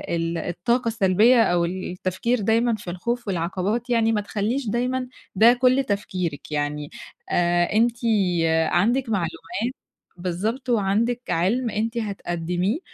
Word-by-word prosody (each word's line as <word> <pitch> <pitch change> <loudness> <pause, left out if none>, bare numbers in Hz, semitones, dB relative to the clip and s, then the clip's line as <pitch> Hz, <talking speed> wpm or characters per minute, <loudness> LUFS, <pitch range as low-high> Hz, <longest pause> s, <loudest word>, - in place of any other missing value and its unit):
ال 165 0 -2
الطاقة 205 +9 -1
السلبيّة 225 +2 +4
أو 175 -4 +2
التفكير 185 +6 -2
دايمًا 230 +3 +2
في 205 -4 -8
الخوف 235 +6 -3
والعقبات 190 +6 -2
يعني 230 -2 +3
ما 210 -2 +1
تخلّيش 220 +6 -2
دايمًا 250 +3 -1 0.3
ده 225 +5 +7
كل 255 +2 +3
تفكيرِك. 185 - -3
يعني 145 0 -2 0.4
آآ 175 0 +2
أنتِ 235 +2 +2 0.7
عَندِك 235 +10 +1
معلومات، 200 +5 -2 0.4
بالضبط، 200 +9 -3
وعَندِك 230 +2 +1
عِلم 225 +9 +1
أنتِ 225 +2 -2
هتقدميه 180 - -2
210 Hz, 120 wpm, -23 LUFS, 175-235 Hz, 0.7 s, ده